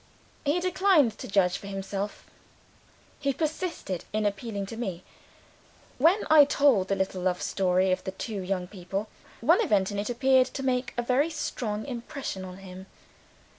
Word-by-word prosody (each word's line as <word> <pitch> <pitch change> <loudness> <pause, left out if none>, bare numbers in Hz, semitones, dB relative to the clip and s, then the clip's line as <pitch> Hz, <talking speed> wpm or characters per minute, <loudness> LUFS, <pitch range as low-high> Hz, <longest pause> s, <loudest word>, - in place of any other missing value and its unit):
He 295 +5 +2
declined 365 - +3
to - - -6
judge 185 -2 +2
for 200 - -10
himself; 195 +1 -4 0.9
he 280 -1 0
persisted 310 - -3
in 215 0 0
appealing 200 0 -2
to 210 - -8
me. 190 -7 -4 1.0
When 340 +9 +4
I 310 -2 +8
told 275 -9 +3
the 195 - +1
little 190 -1 -2
love 180 -1 0
story 185 0 +1
of 185 - 0
the - - -4
two 200 +1 -5
young 185 -1 -2
people, 195 +2 -5 0.3
one - - +5
event 205 - +2
in 205 - -3
it 205 - -2
appeared 260 +1 +4
to 270 - -6
make 255 -1 -1
a 240 - 0
very 260 +6 +2
strong 220 -9 -3
impression 245 -5 -5
on 185 0 -8
him. 190 0 -10
210 Hz, 165 wpm, -27 LUFS, 190-275 Hz, 1.0 s, I